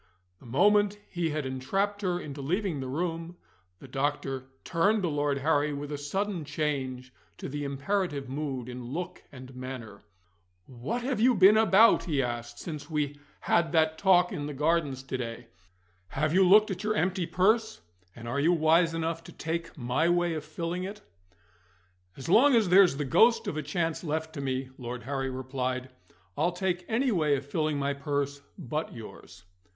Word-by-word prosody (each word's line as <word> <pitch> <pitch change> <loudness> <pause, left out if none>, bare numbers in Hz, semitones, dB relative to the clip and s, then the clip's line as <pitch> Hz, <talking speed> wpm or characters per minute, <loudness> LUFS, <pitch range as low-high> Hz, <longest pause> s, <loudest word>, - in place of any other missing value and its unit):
The - - -15
moment 205 - +3
he 170 -2 -1
had 150 -2 -2
entrapped 195 +11 -1
her 180 -3 0
into 145 -4 -7
leaving 175 +2 -1
the 130 - -4
room, 165 +4 -3 0.4
the 135 - -13
doctor 135 -1 -2 0.2
turned 200 +5 +2
to 175 - +1
Lord 145 -1 0
Harry 145 +1 +1
with 145 +1 -5
a 145 - -3
sudden 190 +4 -2
change 135 -4 -3 0.2
to - - -6
the 145 +1 -4
imperative 140 +1 -2
mood 135 -3 -4
in 125 0 -7
look 155 +9 -5
and 130 -1 -11
manner. 125 -5 -7 0.6
"What 135 - -4
have 255 -3 -1
you 245 +2 +4
been 195 +2 +7
about," 220 +1 +5
he 155 -6 0
asked, 120 -1 -5
"since 150 -2 -7
we 145 -2 -2 0.2
had 170 0 +1
that 160 -1 +2
talk 180 -2 +4
in 145 -6 -4
the 150 - -6
Gardens 150 -3 0
to 135 -1 -4
day? 115 0 -5 0.6
Have 150 - -1
you 185 0 +5
looked 210 +2 +6
at 190 +2 -5
your 215 0 0
empty 180 -1 0
purse, 220 - +1 0.3
and 120 0 -9
are 125 +4 -1
you 165 +5 +4
wise 165 +1 +3
enough 165 0 -2
to - - -10
take 165 +1 -4
my 130 +6 +1
way 175 -1 +2
of 155 -2 -4
filling 165 +3 -4
it?" 200 +3 -7 1.2
"As 135 - -8
long 245 +10 +6
as 220 -5 +3
there's 180 -5 +6
the 145 - -2
ghost 225 - +4
of - - -3
a 155 - -1
chance 165 +3 -2
left 160 0 -3
to 145 - -5
me," 130 -1 -3
Lord 120 0 -6
Harry 135 0 -2
replied, 130 0 -3 0.4
"I'll 170 +4 +1
take 180 -1 -2
any 245 +3 +1
way 155 -7 +2
of 135 0 -5
filling 155 0 -1
my 140 0 0
purse 140 0 -2 0.2
but 155 -2 -4
yours." 95 -5 -11
155 Hz, 180 wpm, -28 LUFS, 135-180 Hz, 1.2 s, been